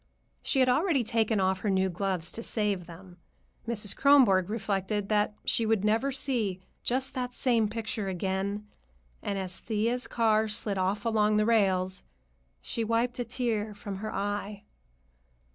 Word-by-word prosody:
She 270 - +2
had 255 - +4
already 285 +1 +2
taken 220 -1 +1
off 190 0 +1
her 210 - -1
new 190 0 +2
gloves 185 -1 -2
to 230 - -5
save 205 -6 -1
them. 175 +1 -12 0.5
Mrs. 210 -4 0
Kronborg 240 -10 +5
reflected 205 -2 -2
that 210 -1 +1
she 230 - +1
would 220 -2 +1
never 225 +6 +2
see 240 -8 0 0.2
just 260 +2 0
that 250 -2 -4
same 235 -4 +2
picture 220 -2 -3
again, 190 +3 -2 0.6
and 200 - -3
as 185 -1 -5
Thea's 230 +3 -1
car 220 -2 +2
slid 210 -2 0
off 195 +3 -1
along 215 -2 +2
the 210 - +3
rails, 190 -4 +2 0.6
she 230 - -2
wiped 230 +3 0
a - - +1
tear 225 -3 -2
from 200 -1 -6
her 215 +2 -5
eye. 205 0 -3
210 Hz, 155 wpm, -29 LUFS, 195-230 Hz, 0.6 s, Kronborg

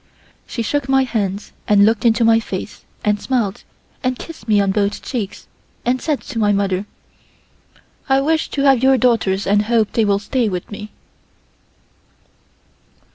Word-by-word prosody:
She 230 - -3
took 275 +3 -1
my 270 0 +4
hands 205 -5 -3 0.2
and 205 -1 +5
looked 225 +2 +1
into 230 0 +4
my 225 0 +5
face 200 -2 -7 0.2
and 210 0 +1
smiled 230 -7 -1 0.4
and 255 -1 0
kissed 315 -10 -10
me 210 -2 +4
on 200 -1 +2
both 200 0 -1
cheeks 220 -7 -5 0.4
and 250 +1 +1
said 300 -4 -1
to 250 -5 -6
my 210 -1 +3
mother: 195 -1 0 1.2
"I 270 0 +4
wish 315 +3 0
to 275 - -2
have 270 -4 +4
your 265 0 +5
daughters 215 -5 +1
and 205 +1 +2
hope 225 -2 +1
they 225 - +2
will 200 -1 +2
stay 225 +3 -1
with 180 0 -5
me." 210 +1 -7
225 Hz, 160 wpm, -19 LUFS, 205-255 Hz, 1.2 s, and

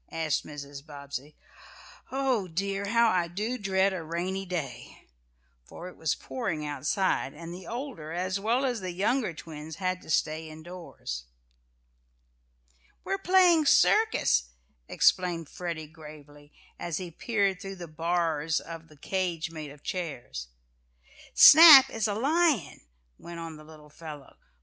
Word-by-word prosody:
asked 160 -2 -1
Mrs. 140 -1 -9
Bobbsey. 140 -1 -8 0.8
"Oh, 260 -7 0
dear, 195 +4 -3
how 230 +2 +4
I 175 -2 +1
do 215 +8 -3
dread 195 -1 +1
a 185 - -4
rainy 180 +4 -4
day!" 140 -9 -6 0.5
for 175 - -10
it - - -15
was 160 -3 -1
pouring 190 -12 -4
outside, 145 +1 -1
and 165 +2 -8
the 180 +1 -10
older, 235 - -6
as 185 +3 -2
well 235 +6 +1
as 245 -3 -1
the 185 -1 -5
younger 215 +4 0
twins 155 -1 -9
had 185 0 -2
to - - -15
stay 155 +1 -1
in 155 0 -11
doors. 170 - -8 1.8
"We're 390 - -2
playing 360 -5 +4
circus," 280 - +4 0.4
explained 170 -4 +1
Freddie 170 -3 -5
gravely, 150 -2 -14 0.3
as 170 -3 -3
he 180 -2 -6
peered 200 +1 0
between 195 0 -8
the 175 -1 -8
"bars" 160 -1 -1
of 165 0 -10
the 155 - -19
cage 175 0 -2
made 155 -2 -7
of 145 +1 -15
chairs. 120 - -5 0.9
"Snap 300 -4 +10
is 225 -1 -1
a 205 - -2
lion," 285 - +1 0.4
went 170 0 -9
on 165 -1 -7
the 155 - -13
little 155 -1 -15
fellow. 150 -3 -11
170 Hz, 140 wpm, -28 LUFS, 155-200 Hz, 1.8 s, Snap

